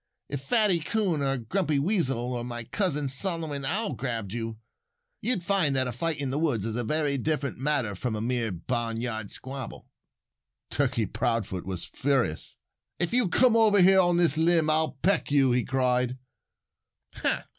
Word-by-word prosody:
"If 140 -2 -4
Fatty 205 - +3
Coon 180 -2 0
or 135 -1 0
Grumpy 150 - -1
Weasel 135 - 0
or 120 -1 -3
my 120 -1 -5
cousin 150 - -1
Solomon 155 0 -1
Owl 200 +10 0
grabbed 115 -7 -4
you, 115 -1 -4 0.6
you'd 235 -7 -1
find 175 -8 +2
that 130 -1 +2
a 125 - -2
fight 160 +6 -2
in 140 -3 -2
the 140 - -1
woods 135 -11 0
is 110 -1 -2
a 120 - -1
very 145 +3 0
different 140 -2 -2
matter 135 -6 0
from 110 +4 -3
a - - -3
mere 115 -1 -1
barnyard 115 +2 -3
squabble." 135 +1 -7 0.8
Turkey 130 -5 +1
Proudfoot 110 -4 -2
was 95 -2 -3
furious. 130 - -1 0.4
"If 175 +3 -1
you'll 245 -6 +2
come 245 +4 +4
over 215 -3 +5
here 190 +1 +6
on 175 -2 +3
this 165 -3 +2
limb 165 -1 +3
I'll 155 0 +1
peck 190 0 +2
you," 135 -3 +4
he 125 0 +2
cried. 125 -1 0
135 Hz, 165 wpm, -27 LUFS, 120-165 Hz, 0.8 s, here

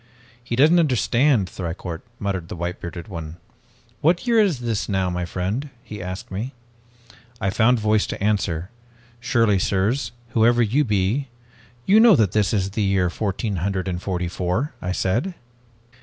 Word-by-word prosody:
"'He 120 -1 -3
doesn't 155 +7 +5
understand, 130 - +2
Thicourt,' 85 -2 -5 0.2
muttered 95 -6 -3
the - - -6
white 85 +1 -4
bearded 85 0 -7
one. 85 -4 -7 0.6
'What 170 +7 +2
year 235 -2 +4
is 185 - +2
this 115 -4 -2
now, 95 -2 0
my 90 0 -2
friend?' 100 - -3
he 105 -4 -8
asked 90 +1 -6
me. 115 +8 -4 0.8
"I 95 - 0
found 120 +4 +3
voice 110 0 +2
to - - -5
answer. 95 -3 0 0.5
'Surely, 115 -5 +2
sirs, 110 +7 0 0.2
whoever 120 +2 +4
you 125 +8 +2
be, 105 +4 0 0.6
you 205 +3 +6
know 225 -3 +8
that 110 - +2
this 105 -2 +2
is 100 -2 0
the 105 - -2
year 95 -3 +2
fourteen 100 0 -2
hundred 95 +2 -2
and 90 -1 -3
forty 90 -2 -2
four,' 90 - -2
I 90 - -2
said. 120 - -1
105 Hz, 160 wpm, -22 LUFS, 90-120 Hz, 0.8 s, know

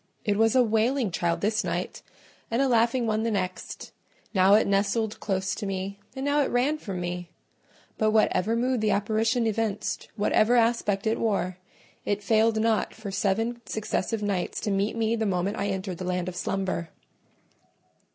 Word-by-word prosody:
It 205 -2 +2
was 225 +3 +3
a 255 - +6
wailing 225 +1 +1
child 170 0 -1
this 215 +1 +1
night, - - -3 0.5
and 230 - 0
a 275 - +3
laughing 235 0 +2
one 215 -1 0
the 230 - 0
next: 185 -4 -4 0.4
now 190 0 +6
it 220 - +4
nestled 205 +2 0
close 190 -2 -1
to 205 - -4
me, 195 +1 -4 0.2
and 265 +1 -4
now 290 +1 +3
it 275 - +1
ran 270 +6 +1
from 195 -9 -5
me; 175 0 -4 0.7
but 215 - +3
whatever 215 0 +2
mood 250 0 0
the 215 - +2
apparition 220 +4 +1
evinced, 220 -2 -2
whatever 215 +2 +3
aspect 230 -4 +2
it 220 +1 +1
wore, 190 -5 -1 0.4
it 205 0 -1
failed 220 +1 +3
not 220 -1 +1
for 220 -3 -7
seven 225 +5 0
successive 215 0 -2
nights 195 -3 -1
to 210 - -1
meet 200 +3 0
me 225 0 +1
the 220 -1 -1
moment 190 +1 -1
I 200 - 0
entered 190 -2 -3
the - - -4
land 180 -1 -1
of 185 - -5
slumber. 185 -2 -2
215 Hz, 175 wpm, -26 LUFS, 195-230 Hz, 0.7 s, a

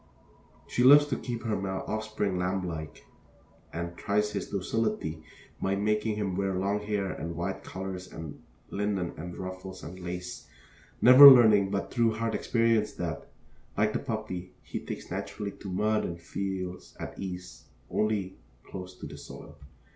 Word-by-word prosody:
She 125 - +1
loves 145 +3 +9
to 130 - 0
keep 120 -2 -5
her 110 -2 0
male 95 -1 -3
offspring 110 -3 -2
lamblike, 90 -4 -3 0.7
and 85 +1 -4
tries 105 +3 0
his - - -4
docility 100 -5 -1 0.4
by 95 0 +1
making 105 +2 0
him 100 -3 -2
wear 95 0 0
long 100 +2 0
hair 105 -2 -2
and 85 +3 -5
wide 90 +3 -3
collars 95 -1 -6
and 80 -3 -8 0.3
linen 100 -4 -1
and 90 +2 -7
ruffles 95 0 -7
and 90 +3 -8
lace, 90 0 -6 0.6
never 130 +3 +12
learning 110 -6 +7
but 100 0 -2
through 115 -3 +2
hard 115 0 -1
experience 115 -2 +2
that, 85 -2 -4 0.5
like 105 +1 +2
the - - 0
puppy, 110 -7 -5
he - - -5
takes - - -7
naturally 105 -1 -4
to 100 - -9
mud 105 +3 +1
and 85 0 -4
feels 90 +1 -5
at - - -7
ease 90 -2 -7 0.3
only 105 -3 -1 0.2
close 90 -1 -8
to - - -9
the 75 -1 -9
soil. 70 +1 -11
95 Hz, 155 wpm, -29 LUFS, 90-105 Hz, 0.7 s, never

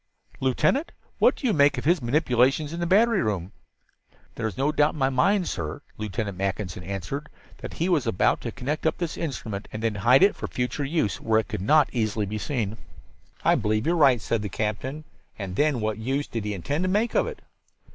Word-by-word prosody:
"Lieutenant, 135 - +1 0.3
what - - +5
do - - -7
you 230 - +3
make 145 -1 +4
of - - -4
his 170 0 +3
manipulations 135 +3 +2
in 170 - -4
the 170 - -1
battery 215 +2 +4
room?" 95 -3 -2 0.8
"There 115 - -2
is 105 - -6
no 140 +3 +2
doubt 150 0 +2
in - - -9
my 135 -1 +1
mind, 185 +8 +2
sir," 75 -3 -4
Lieutenant 105 -2 -4
Mackinson 95 -2 -3
answered, 100 - -5 0.3
"that - - -7
he 170 - 0
was 165 -9 +1
about 115 - +2
to - - -4
connect 150 +5 -2
up - - 0
this 170 -2 -3
instrument 110 -10 -4
and 110 - -6
then 115 -2 +1
hide 120 - +5
it 205 - +5
for - - -5
future 125 +3 -2
use 135 - -1
where 110 -1 +3
it 110 - -3
could 105 -5 -4
not 150 +8 +4
easily 110 -3 0
be 105 +2 -4
seen." 110 -2 -2 0.7
"I - - +6
believe 110 +1 0
you 170 - +2
are - - +1
right," 135 -7 +5
said 110 +1 -1
the 105 - -4
captain. 110 +9 -3 0.3
"And 95 -3 -5
then 145 -1 +2
what 110 0 -2
use 135 +5 -1
did 115 -3 -5
he 105 -1 -2
intend 140 - -2
to - - +1
make 210 +5 +1
of - - +2
it?" 470 -2 -8
125 Hz, 215 wpm, -25 LUFS, 105-155 Hz, 0.8 s, I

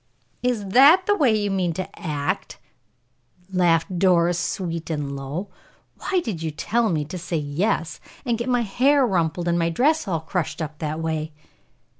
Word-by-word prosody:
"Is 235 -6 -1
that 290 - +7
the 410 - +3
way 255 - +3
you 205 -1 -1
mean 185 -3 0
to 185 +3 -4
act?" 145 -4 -3 1.0
laughed 175 0 +2
Doris, 175 -2 +3
sweet 170 -2 -3
and 145 -3 -3
low. 145 +9 -5 0.5
"Why 370 -2 0
did 195 -9 -4
you 160 - -2
tell 220 +9 0
me 155 -3 0
to 180 +4 -6
say 170 -1 -3
'yes,' 155 +1 -1 0.3
and 240 -2 +1
get 235 +2 -3
my 245 -1 +2
hair 265 +6 +3
rumpled, 175 -4 0
and 170 0 +2
my 165 0 +1
dress 285 - +1
all 165 -4 -1
crushed 175 +1 -3
up 155 -1 -5
that 155 0 -3
way?" 160 -1 -3
175 Hz, 170 wpm, -23 LUFS, 160-225 Hz, 1.0 s, that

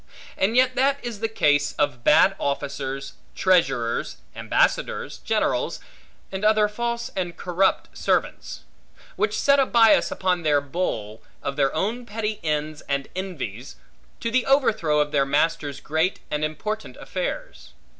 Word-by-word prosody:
And 200 +5 +1
yet 255 0 +4
that 275 +2 +2
is 235 -4 -5
the 225 - 0
case 145 -8 +2
of 140 -5 -1
bad 190 +8 +5
officers, 140 -1 -3 0.2
treasurers, 120 - +1 0.2
ambassadors, - - 0
generals, - - 0 0.5
and 190 +1 -5
other 215 0 +4
false 235 +3 -3
and 175 -2 -3
corrupt 185 +2 0
servants; - - -1 0.5
which 430 - 0
set 280 0 +4
a 270 - +4
bias 225 -2 +5
upon 180 -2 0
their 150 -3 +3
bowl, 135 - -3 0.2
of 140 - -3
their 135 -1 +2
own 230 +8 -2
petty 215 0 -3
ends 155 0 -2
and 140 0 -1
envies, 140 - -5 0.5
to 230 - -2
the 255 +1 +1
overthrow 215 - +3
of 150 0 -1
their 140 -2 +3
master's 145 0 0
great 160 +5 0
and 150 0 -1
important 210 +9 -4
affairs. - - -5
175 Hz, 140 wpm, -24 LUFS, 145-220 Hz, 0.5 s, bad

